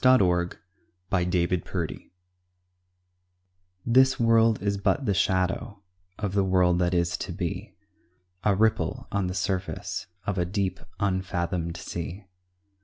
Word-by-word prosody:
A 130 Hz, 0 st, +7 dB
WORLD 90 Hz, -3 st, +1 dB, 0.5 s
REDEEMED 90 Hz, -1 st, -1 dB, 1.8 s
This 130 Hz, +3 st, +4 dB
world 115 Hz, -1 st, +4 dB
is 100 Hz, -1 st, -1 dB
but 135 Hz, +7 st, +1 dB
the 100 Hz, -, +2 dB
shadow 95 Hz, +2 st, 0 dB, 0.3 s
Of 105 Hz, -3 st, -3 dB
the 100 Hz, -1 st, +3 dB
world 90 Hz, -2 st, +3 dB
that 90 Hz, 0 st, +1 dB
is 85 Hz, 0 st, +1 dB
to -, -, -5 dB
be, 90 Hz, +3 st, -4 dB, 0.7 s
A 105 Hz, -2 st, +3 dB
ripple 110 Hz, +2 st, +1 dB
on 100 Hz, -2 st, 0 dB
the 90 Hz, -, -3 dB
surface 95 Hz, 0 st, -2 dB, 0.2 s
Of 100 Hz, -2 st, -1 dB
a 90 Hz, -, +2 dB
deep, 95 Hz, 0 st, -1 dB, 0.2 s
unfathomed 90 Hz, -4 st, -1 dB
sea. 90 Hz, +3 st, -6 dB
95 Hz, 120 wpm, -27 LUFS, 90-100 Hz, 1.8 s, A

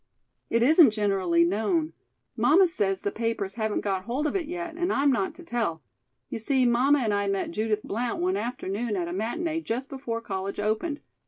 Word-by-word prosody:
"It 230 Hz, 0 st, +2 dB
isn't 310 Hz, +2 st, +7 dB
generally 195 Hz, -5 st, +2 dB
known. 225 Hz, -, 0 dB, 0.4 s
Mamma 365 Hz, +6 st, +5 dB
says 200 Hz, -, -1 dB
the 200 Hz, -, 0 dB
papers 225 Hz, -4 st, -2 dB
haven't 220 Hz, -1 st, -1 dB
got 190 Hz, -2 st, -2 dB
hold 255 Hz, +6 st, -2 dB
of 305 Hz, -, -1 dB
it 350 Hz, -5 st, -1 dB
yet, 345 Hz, 0 st, -5 dB
and 350 Hz, +2 st, 0 dB
I'm 280 Hz, +1 st, +3 dB
not 320 Hz, +6 st, -1 dB
to 350 Hz, -, -12 dB
tell. 225 Hz, -, -2 dB, 0.4 s
You -, -, -5 dB
see 260 Hz, +3 st, +2 dB
mamma 260 Hz, +4 st, +4 dB
and 215 Hz, -2 st, +1 dB
I 200 Hz, 0 st, 0 dB
met 195 Hz, -1 st, -1 dB
Judith 215 Hz, +2 st, -1 dB
Blount 235 Hz, +3 st, -2 dB
one 185 Hz, +2 st, +1 dB
afternoon 220 Hz, 0 st, -3 dB
at 175 Hz, -3 st, -2 dB
a 175 Hz, -, -4 dB
matinee 320 Hz, -, -2 dB
just 255 Hz, -1 st, -3 dB
before 260 Hz, -4 st, -4 dB
college 195 Hz, -3 st, -4 dB
opened. 220 Hz, +9 st, -1 dB
230 Hz, 190 wpm, -26 LUFS, 200-290 Hz, 0.4 s, isn't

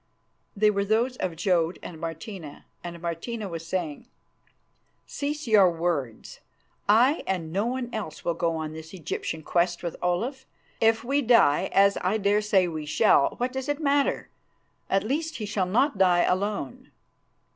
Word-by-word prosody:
They 210 Hz, +1 st, +4 dB
were 200 Hz, -1 st, 0 dB
those 225 Hz, +5 st, +1 dB
of 180 Hz, -3 st, -3 dB
Jodd 170 Hz, -1 st, +1 dB
and 160 Hz, -, -8 dB
Martina, 165 Hz, -1 st, -7 dB, 0.2 s
and 170 Hz, -1 st, -7 dB
Martina 180 Hz, +6 st, -4 dB
was 165 Hz, -2 st, -7 dB
saying, 170 Hz, +3 st, -3 dB, 1.0 s
"Cease 295 Hz, +2 st, -4 dB
your 210 Hz, -5 st, +6 dB
words. 165 Hz, -9 st, -3 dB, 0.5 s
I 245 Hz, +9 st, +5 dB
and 165 Hz, -4 st, -2 dB
no 200 Hz, +4 st, 0 dB
one 255 Hz, 0 st, -2 dB
else 210 Hz, -8 st, -6 dB
will 170 Hz, -, +1 dB
go 165 Hz, 0 st, -1 dB
on 155 Hz, -1 st, -4 dB
this 160 Hz, +3 st, -9 dB
Egyptian 160 Hz, -1 st, -4 dB
quest 175 Hz, +1 st, 0 dB
with 170 Hz, -, -3 dB
Olaf. 230 Hz, +10 st, -2 dB, 0.3 s
If 225 Hz, 0 st, +3 dB
we 275 Hz, +4 st, +1 dB
die, 230 Hz, -, +4 dB
as 200 Hz, 0 st, +4 dB
I 185 Hz, +4 st, +1 dB
dare 205 Hz, 0 st, +2 dB
say 195 Hz, -3 st, +3 dB
we 155 Hz, -3 st, -5 dB
shall, 140 Hz, -2 st, +3 dB
what 250 Hz, +1 st, -2 dB
does 265 Hz, +2 st, -4 dB
it 290 Hz, 0 st, -1 dB
matter? 285 Hz, -2 st, +1 dB, 0.6 s
At 195 Hz, -, +2 dB
least 305 Hz, +7 st, -2 dB
he 215 Hz, -, -4 dB
shall 205 Hz, -3 st, -1 dB
not 230 Hz, +3 st, +1 dB
die 180 Hz, -2 st, +4 dB
alone." 190 Hz, -, -2 dB
195 Hz, 160 wpm, -26 LUFS, 170-230 Hz, 1.0 s, your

